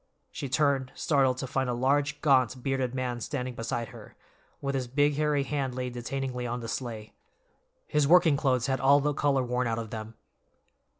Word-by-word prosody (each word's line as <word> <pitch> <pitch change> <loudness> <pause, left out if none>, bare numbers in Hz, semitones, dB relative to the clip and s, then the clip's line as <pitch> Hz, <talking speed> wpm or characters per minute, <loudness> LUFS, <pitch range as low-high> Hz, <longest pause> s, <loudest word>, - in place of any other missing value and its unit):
She 140 - -5
turned, 140 -2 +1
startled, 135 -4 +2
to 130 - -3
find 130 0 -1
a 120 - 0
large, 140 +4 +1
gaunt, 130 -3 +3
bearded 130 -2 -1
man 125 -2 -2
standing 125 +2 -3
beside 115 0 -3
her, - - -13 0.4
with 140 0 -2
his 130 -2 -2
big, 145 +4 +2
hairy 150 -1 +1
hand 135 -3 -2
laid 125 -1 -3
detainingly 125 0 -3
on 120 - -2
the 115 - -6
sleigh. 115 -3 -5 0.7
His 150 -2 +1
working 165 -2 +6
clothes 130 -4 +1
had 135 -1 0
all 140 +2 +6
the 145 +1 0
color 140 -2 +1
worn 125 0 -1
out 115 -1 -1
of 115 -2 -5
them. 110 0 -6
130 Hz, 185 wpm, -28 LUFS, 125-140 Hz, 0.7 s, working